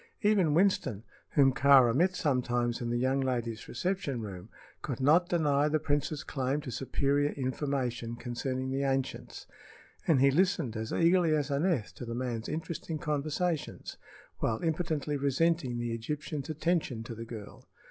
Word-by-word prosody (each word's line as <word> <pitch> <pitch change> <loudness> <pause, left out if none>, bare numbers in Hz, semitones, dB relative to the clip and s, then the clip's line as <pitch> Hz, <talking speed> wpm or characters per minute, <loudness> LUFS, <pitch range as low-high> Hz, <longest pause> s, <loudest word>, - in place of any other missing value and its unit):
Even 195 -8 +3
Winston, 155 - +2 0.3
whom 135 -2 +5
Kāra 135 -3 +6
met 180 +7 +2
sometimes 120 -6 0
in 120 - -2
the 120 - 0
young 130 +2 +1
lady's 120 -4 -2
reception 160 -3 -2
room, 100 -2 -7 0.3
could 135 -5 -4
not 160 +7 +4
deny 150 -4 +2
the 155 +1 +2
prince's 150 0 -1
claim 135 +1 -1
to 130 - -6
superior 140 +3 0
information 130 -3 -2
concerning 130 +2 -3
the 135 +1 -1
ancients, 135 -1 -2 0.6
and 155 -5 +4
he 140 +1 +5
listened 170 - +1
as 110 0 -4
eagerly 170 -1 +3
as 145 -1 -1
Aneth 140 - 0
to - - -8
the 115 0 -4
man's 120 -2 -3
interesting 160 0 -4
conversations, 150 +2 -2 0.4
while 110 +5 -1
impotently 155 -3 -1
resenting 140 -1 +1
the 120 -1 -2
Egyptian's 145 +5 -4
attention 155 -7 -1
to 115 - -7
the 115 0 -7
girl. 110 -3 -10
140 Hz, 150 wpm, -30 LUFS, 120-155 Hz, 0.6 s, Kāra